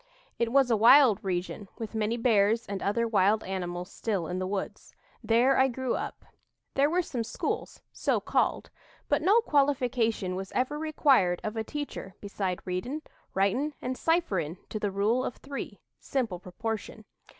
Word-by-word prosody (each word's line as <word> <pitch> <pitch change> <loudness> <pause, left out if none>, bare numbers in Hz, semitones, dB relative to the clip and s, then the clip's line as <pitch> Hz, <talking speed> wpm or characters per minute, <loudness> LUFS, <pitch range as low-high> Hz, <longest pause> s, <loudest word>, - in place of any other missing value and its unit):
It 235 -1 +1
was 270 -2 +4
a - - +5
wild 235 0 +6
region 185 +2 -3
with 225 -1 -6
many 220 +1 0
bears 225 -1 +3
and 200 -1 -5
other 230 +4 +1
wild 210 0 +3
animals 180 0 -4
still 200 -7 -2
in 180 +3 -3
the 185 - -2
woods. 195 0 -5 0.3
There 245 +4 +4
I 265 - +5
grew 260 0 -2
up. - - -5 0.5
There 280 +2 +3
were 355 +3 +1
some 245 -7 -3
schools, 225 - -4
so - - +1
called; - - 0 0.4
but 290 - +2
no 405 +8 +5
qualification 250 - +1
was 190 0 -5
ever 275 +4 0
required 275 - +3
of 215 +1 -3
a 220 - -1
teacher 280 -8 -6
beside 195 -3 -4
readin', 245 +12 -3 0.3
writin', 245 +10 +1
and 255 +1 -3
cipherin' 195 - 0
to 215 - -4
the 205 - 0
Rule 210 +6 +1
of 250 - -3
Three 275 0 -7 0.2
(simple 230 -10 -2
proportion). 220 +5 -5
225 Hz, 160 wpm, -28 LUFS, 195-265 Hz, 0.5 s, wild